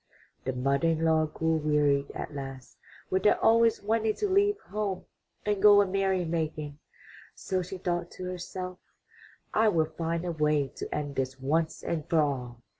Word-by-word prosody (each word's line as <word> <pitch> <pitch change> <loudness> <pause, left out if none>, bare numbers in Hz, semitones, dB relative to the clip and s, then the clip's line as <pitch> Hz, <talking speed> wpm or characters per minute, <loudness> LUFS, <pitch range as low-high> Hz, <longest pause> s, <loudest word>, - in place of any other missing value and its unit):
'' - - -36
The 130 - -1
mother 140 +5 +1
in 165 0 +1
law 160 -1 +3
grew 160 +1 0
wearied 150 -2 +2
at - - -5
last 135 -2 -8 0.4
with 190 - +2
their 210 - +4
always 230 -1 +4
wanting 220 +1 +1
to 415 - -1
leave 405 +2 +3
home 205 - -3 0.4
and 205 -2 0
go 205 -1 +8
a 205 - +5
merry 190 -1 0
making, 155 -3 -3 0.6
so 185 -2 -2
she 185 +2 -6
thought 175 -1 -2
to 185 - -8
herself, 180 0 -6 0.7
''I 220 0 +4
will 160 -3 +2
find 165 +1 -2
a 175 - -1
way 150 -3 +1
to - - -5
end 145 -2 -3
this 130 0 -2
once 155 +5 0
and 160 -3 -3
for 165 - +3
all." 125 -5 -2
165 Hz, 180 wpm, -28 LUFS, 150-195 Hz, 0.7 s, go